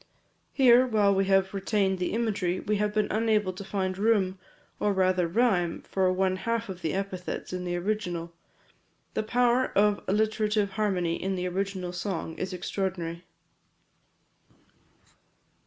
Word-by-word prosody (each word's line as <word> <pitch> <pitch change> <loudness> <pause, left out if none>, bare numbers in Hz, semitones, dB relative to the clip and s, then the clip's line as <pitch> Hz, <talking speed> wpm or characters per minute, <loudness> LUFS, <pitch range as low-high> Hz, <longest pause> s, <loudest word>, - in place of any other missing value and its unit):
Here, 255 -1 +6
while 210 -4 +3
we 195 0 +2
have 195 0 +2
retained 195 -1 0
the 180 - -1
imagery, 205 -6 0
we 210 0 -1
have 210 0 0
been 215 0 +1
unable 215 -3 +1
to 185 - -8
find 190 -1 -2
room, 200 -4 +2 0.4
or 205 - +1
rather 185 -2 +2
rhyme, 180 -4 +1
for 190 -1 +1
one 185 0 +1
half 230 +2 -2
of 185 -1 -7
the 160 +1 -1
epithets 190 -2 -4
in 180 0 -3
the 175 0 -2
original. 175 -3 -3 0.8
The - - 0
power 245 +3 +2
of 205 0 +3
alliterative 210 0 +1
harmony 190 -5 -1
in 190 0 -1
the 180 0 -2
original 185 -1 -3
song 180 -3 -4
is 185 - -3
extraordinary. 180 -2 -3
195 Hz, 140 wpm, -27 LUFS, 185-210 Hz, 0.8 s, Here